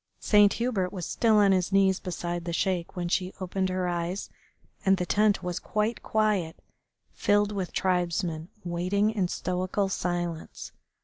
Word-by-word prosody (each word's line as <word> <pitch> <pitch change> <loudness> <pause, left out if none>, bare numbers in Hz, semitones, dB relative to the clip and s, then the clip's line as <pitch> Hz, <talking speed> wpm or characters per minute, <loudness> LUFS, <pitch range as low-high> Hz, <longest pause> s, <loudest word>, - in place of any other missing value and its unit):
Saint 205 -1 +5
Hubert 220 -7 -1
was 180 -4 -5
still 225 -2 +2
on 205 -2 +5
his 185 0 +1
knees 195 -1 +3
beside 175 -1 -4
the 170 - -3
Sheik 180 0 -1
when 175 -1 -2
she 185 +1 -1
opened 190 0 -1
her 185 -1 -1
eyes, 175 +2 -3 0.5
and 195 -1 +4
the 180 - -1
tent 210 +2 +2
was 180 0 -3
quite 215 +2 -1
quiet, 210 -7 0 0.6
filled 205 0 +2
with 195 -3 -3
tribesmen 175 -2 -1
waiting 180 +5 0
in 200 -5 0
stoical 185 +3 -1
silence. 175 -3 -3
185 Hz, 150 wpm, -27 LUFS, 175-205 Hz, 0.6 s, Saint